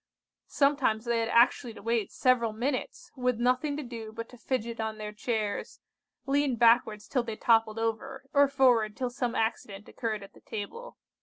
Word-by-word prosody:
Sometimes 275 Hz, -6 st, +1 dB
they 235 Hz, -1 st, +1 dB
had 225 Hz, 0 st, -1 dB
actually 235 Hz, -1 st, +3 dB
to -, -, -11 dB
wait 230 Hz, -1 st, 0 dB
several 235 Hz, -4 st, +2 dB
minutes, 260 Hz, -, -3 dB
with 250 Hz, -3 st, 0 dB
nothing 255 Hz, +4 st, +1 dB
to 300 Hz, -, -4 dB
do 230 Hz, -3 st, -7 dB
but 230 Hz, +1 st, -7 dB
to 250 Hz, -, -14 dB
fidget 235 Hz, -3 st, -3 dB
on 220 Hz, -1 st, -3 dB
their 210 Hz, -1 st, -5 dB
chairs, 215 Hz, -1 st, -3 dB, 0.5 s
lean 280 Hz, -1 st, +1 dB
backwards 230 Hz, -2 st, +3 dB
till 255 Hz, -, +1 dB
they 230 Hz, -2 st, -5 dB
toppled 225 Hz, -1 st, +3 dB
over, 260 Hz, +4 st, -3 dB
or 285 Hz, 0 st, +6 dB
forward 245 Hz, -6 st, +3 dB
till 255 Hz, -2 st, -2 dB
some 245 Hz, -1 st, -2 dB
accident 210 Hz, -3 st, -2 dB
occurred 215 Hz, -3 st, -4 dB
at 195 Hz, -, -13 dB
the -, -, -18 dB
table. 465 Hz, -, -7 dB
235 Hz, 175 wpm, -29 LUFS, 220-255 Hz, 0.5 s, or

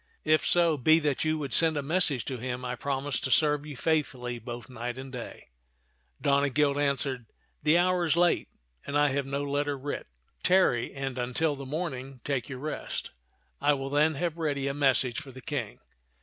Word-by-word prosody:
If 155 Hz, -1 st, +3 dB
so 170 Hz, -2 st, +3 dB
be 155 Hz, +5 st, +5 dB
that 150 Hz, -4 st, 0 dB
you 155 Hz, 0 st, +1 dB
would 145 Hz, -3 st, -3 dB
send 160 Hz, -2 st, +4 dB
a 145 Hz, -, -1 dB
message 150 Hz, -, +2 dB
to 130 Hz, -3 st, -4 dB
him, 125 Hz, +1 st, -4 dB
I 125 Hz, 0 st, -2 dB
promise 140 Hz, +1 st, -2 dB
to -, -, -2 dB
serve 150 Hz, +2 st, +3 dB
you 145 Hz, -4 st, -7 dB
faithfully 130 Hz, -7 st, -1 dB
both 120 Hz, +1 st, -7 dB
night 120 Hz, 0 st, -5 dB
and 135 Hz, 0 st, -7 dB
day." 125 Hz, -, -8 dB, 0.7 s
Donegild 140 Hz, 0 st, +2 dB
answered, 140 Hz, -4 st, 0 dB, 0.2 s
" -, -, -43 dB
The 155 Hz, +3 st, +4 dB
hour 180 Hz, 0 st, +3 dB
is 165 Hz, -1 st, +2 dB
late, 175 Hz, -1 st, +3 dB, 0.4 s
and 140 Hz, -, 0 dB
I 145 Hz, 0 st, +4 dB
have 135 Hz, 0 st, -1 dB
no 140 Hz, +1 st, -2 dB
letter 145 Hz, 0 st, -1 dB
writ. 145 Hz, +2 st, -5 dB, 0.3 s
Tarry, 180 Hz, -11 st, +3 dB
and 135 Hz, -2 st, -4 dB
until 135 Hz, +5 st, 0 dB
the 140 Hz, -1 st, -8 dB
morning 135 Hz, -4 st, -4 dB
take 135 Hz, -3 st, -2 dB
your 130 Hz, -, -5 dB
rest. 150 Hz, +4 st, -4 dB, 0.5 s
I 145 Hz, +1 st, +4 dB
will 135 Hz, -1 st, -4 dB
then 150 Hz, +2 st, +3 dB
have 170 Hz, +2 st, -2 dB
ready 145 Hz, -4 st, -1 dB
a 140 Hz, -, -1 dB
message 135 Hz, -4 st, +2 dB
for 140 Hz, -3 st, -11 dB
the 130 Hz, -, -11 dB
King." -, -, -4 dB
140 Hz, 190 wpm, -28 LUFS, 130-155 Hz, 0.7 s, be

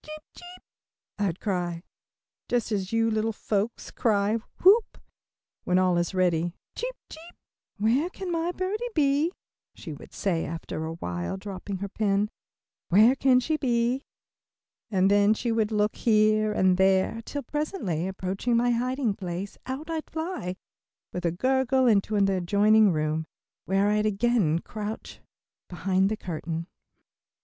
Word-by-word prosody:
"Cheep, 310 Hz, 0 st, -9 dB
cheep," 355 Hz, +1 st, -12 dB, 0.6 s
I'd 195 Hz, -4 st, -1 dB
cry, 175 Hz, -4 st, -2 dB, 0.7 s
just 240 Hz, -2 st, 0 dB
as 195 Hz, -3 st, -2 dB
you 225 Hz, 0 st, +2 dB
little 220 Hz, +1 st, 0 dB
folks 215 Hz, +1 st, -2 dB
cry 210 Hz, -1 st, +1 dB, 0.3 s
"whoop," 410 Hz, +4 st, +5 dB, 0.7 s
when 180 Hz, -, +2 dB
all 185 Hz, -1 st, +3 dB
is 175 Hz, +2 st, -2 dB
ready, 175 Hz, -1 st, +1 dB, 0.2 s
"cheep, -, -, -4 dB
cheep." 330 Hz, +2 st, -12 dB, 0.4 s
"Where 240 Hz, -, +2 dB
can 375 Hz, -1 st, -6 dB
my 335 Hz, +1 st, 0 dB
birdie 380 Hz, +5 st, -3 dB
be?" 295 Hz, +2 st, +2 dB, 0.4 s
she -, -, -8 dB
would -, -, -12 dB
say 175 Hz, -5 st, -1 dB
after 160 Hz, 0 st, -5 dB
awhile, 90 Hz, -, -4 dB
dropping 195 Hz, 0 st, -6 dB
her 200 Hz, -, -2 dB
pen. 205 Hz, 0 st, 0 dB, 0.6 s
"Where 215 Hz, +8 st, +6 dB
can 265 Hz, -2 st, +4 dB
she 310 Hz, +5 st, -1 dB
be?" 245 Hz, -1 st, +1 dB, 0.9 s
and 195 Hz, -2 st, +3 dB
then 205 Hz, +1 st, +5 dB
she 235 Hz, +1 st, -2 dB
would 225 Hz, -1 st, +1 dB
look 210 Hz, 0 st, +1 dB
here 215 Hz, -1 st, +3 dB
and 185 Hz, -3 st, +3 dB
there, 190 Hz, +4 st, +2 dB
till 285 Hz, +4 st, -5 dB
presently 245 Hz, -, -2 dB
approaching 190 Hz, +5 st, -1 dB
my 245 Hz, +1 st, +3 dB
hiding 250 Hz, -1 st, 0 dB
place, 190 Hz, 0 st, -5 dB
out 265 Hz, +4 st, -4 dB
I'd 325 Hz, -2 st, -4 dB
fly, 320 Hz, -, -4 dB, 0.6 s
with 180 Hz, -1 st, -1 dB
a -, -, +1 dB
gurgle, 260 Hz, +6 st, +2 dB
into 215 Hz, -2 st, +3 dB
an 200 Hz, -1 st, +4 dB
adjoining 200 Hz, +3 st, +4 dB
room, 155 Hz, 0 st, -1 dB, 0.4 s
where 195 Hz, +2 st, +2 dB
I'd 210 Hz, 0 st, +2 dB
again 210 Hz, -6 st, +2 dB
crouch 215 Hz, 0 st, -7 dB, 0.5 s
behind 190 Hz, +2 st, +1 dB
the 215 Hz, -, -2 dB
curtain. 165 Hz, -2 st, -4 dB
210 Hz, 140 wpm, -27 LUFS, 185-250 Hz, 0.9 s, Where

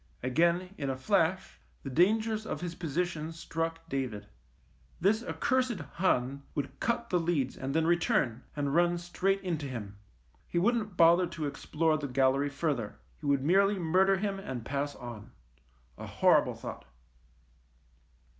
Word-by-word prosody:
Again, 170 Hz, +8 st, +1 dB
in 140 Hz, -2 st, -2 dB
a 130 Hz, -, -2 dB
flash, 185 Hz, +3 st, 0 dB, 0.2 s
the 135 Hz, -, -5 dB
dangers 215 Hz, -, +2 dB
of -, -, -4 dB
his 175 Hz, -1 st, -4 dB
position 165 Hz, -1 st, -2 dB
struck 165 Hz, 0 st, -4 dB
David. 125 Hz, -7 st, -3 dB, 0.7 s
This 215 Hz, +5 st, +2 dB
accursed 255 Hz, -3 st, 0 dB
Hun 140 Hz, -3 st, 0 dB
would 140 Hz, -2 st, -4 dB
cut 235 Hz, 0 st, -1 dB
the 180 Hz, -, +3 dB
leads 160 Hz, -6 st, 0 dB
and 135 Hz, +2 st, -4 dB
then 160 Hz, 0 st, +3 dB
return, 160 Hz, -8 st, +1 dB
and 140 Hz, -1 st, -1 dB
run 175 Hz, +1 st, +3 dB
straight 185 Hz, +3 st, -1 dB
into 165 Hz, -6 st, -3 dB
him. 105 Hz, -6 st, -7 dB, 0.5 s
He -, -, -3 dB
wouldn't 210 Hz, 0 st, +1 dB
bother 170 Hz, +2 st, +6 dB
to 160 Hz, -2 st, -5 dB
explore 155 Hz, +2 st, 0 dB
the 145 Hz, -, -3 dB
gallery 135 Hz, +2 st, +2 dB
further. 135 Hz, -6 st, -2 dB, 0.2 s
He 150 Hz, -, -6 dB
would 140 Hz, -2 st, +2 dB
merely 195 Hz, +6 st, +4 dB
murder 185 Hz, +3 st, +3 dB
him, 195 Hz, 0 st, -2 dB
and 130 Hz, -, -6 dB
pass 145 Hz, +2 st, -2 dB
on. 120 Hz, -4 st, -9 dB, 0.7 s
A -, -, -6 dB
horrible -, -, +3 dB
thought. -, -, -8 dB
165 Hz, 145 wpm, -30 LUFS, 140-185 Hz, 0.7 s, bother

